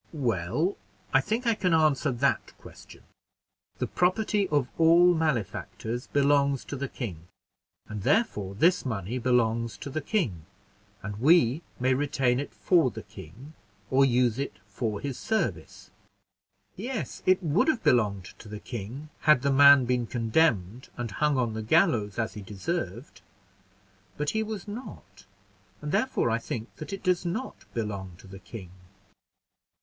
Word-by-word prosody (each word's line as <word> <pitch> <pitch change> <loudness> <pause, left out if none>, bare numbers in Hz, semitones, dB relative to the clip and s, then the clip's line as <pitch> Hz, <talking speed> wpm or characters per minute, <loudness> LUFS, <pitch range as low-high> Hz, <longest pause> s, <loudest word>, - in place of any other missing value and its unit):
"Well, 125 - -1 0.4
I 135 - +6
think 225 - -2
I 230 - +4
can 180 -5 +1
answer 155 -2 +3
that 125 +3 -1
question. - - -14 0.7
The - - -1
property 200 +2 +1
of 145 -5 +1
all 170 +2 +6
malefactors 125 - -2
belongs 140 -1 +2
to - - -5
the 140 0 -3
king; 90 - -7 0.6
and 105 -1 -6
therefore 105 - 0
this 170 - +3
money 110 -1 -3
belongs 115 -2 +1
to 140 - -7
the 155 - -2
king; 100 - -2 0.6
and 100 +1 -5
we 145 -1 +4 0.2
may 130 +1 +2
retain 130 -2 +1
it 145 - -5
for 170 -7 +3
the 110 -2 -9
king, 105 - -12 0.4
or 135 +1 +5
use 125 -2 +2
it 140 -7 -3
for 105 +1 -3
his 140 -3 -5
service." 120 - -3 0.8
"Yes, 235 +3 -5
it 185 0 +4
would 165 - +2
have 310 -8 +1
belonged 100 -6 +2
to 110 - -12
the 105 0 -7
king, 120 +8 -7 0.2
had 145 -4 +6
the 140 - +2
man 140 -1 +7
been 125 -1 0
condemned, 115 - 0
and 120 -3 -4
hung 150 +5 +1
on 120 -3 0
the 110 - -4
gallows 105 -2 +2
as 115 -1 -1
he 105 - -8
deserved; 105 - -5 1.0
but 150 0 -1
he 220 - 0
was 215 -3 -5
not, 225 +5 -10 0.5
and 150 0 -5
therefore 210 - +1
I 115 - +1
think 115 0 -6
that 155 - -8
it 195 - -6
does 180 -1 +1
not 185 +9 -4
belong 100 -5 -4
to - - -16
the 95 0 -11
king." 95 -2 -10
130 Hz, 155 wpm, -27 LUFS, 110-160 Hz, 1.0 s, man